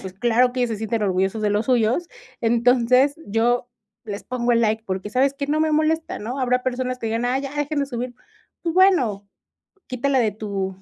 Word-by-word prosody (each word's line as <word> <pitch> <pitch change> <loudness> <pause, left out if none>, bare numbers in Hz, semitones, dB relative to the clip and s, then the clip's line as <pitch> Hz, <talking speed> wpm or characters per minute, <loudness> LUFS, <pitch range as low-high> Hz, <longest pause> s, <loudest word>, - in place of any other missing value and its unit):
pues, 190 -1 -8
claro 240 +4 +2
que 255 - -3
ellos 245 -2 +1
se 220 - -2
sienten 220 +1 -2
orgullosos 190 +2 0
de 210 - +1
los 210 +2 0
suyos. 250 +7 +1 0.3
Entonces, 245 +4 +3
yo 240 +4 +1 0.4
les 205 -2 -6
pongo 245 -1 -1
el 235 - +3
like 220 0 0
porque, 190 +2 -4
¿sabes 270 +3 +2
qué? 280 0 -4
No 305 +2 0
me 315 -1 +1
molesta 315 +1 0
¿no? 240 +6 -5
Habrá 250 0 +1
personas 255 0 -2
que 225 - -4
digan: 225 +2 -1
"Ay, 260 +2 0
ya 275 0 -6
dejen 295 0 -1
de 280 - -1
subir", 245 -1 -5 0.5
pues 335 -1 -2
bueno, 255 - +3 0.6
quítala 265 +2 0
de 220 -5 +2
tu 200 -3 -4
245 Hz, 205 wpm, -22 LUFS, 220-270 Hz, 0.6 s, Entonces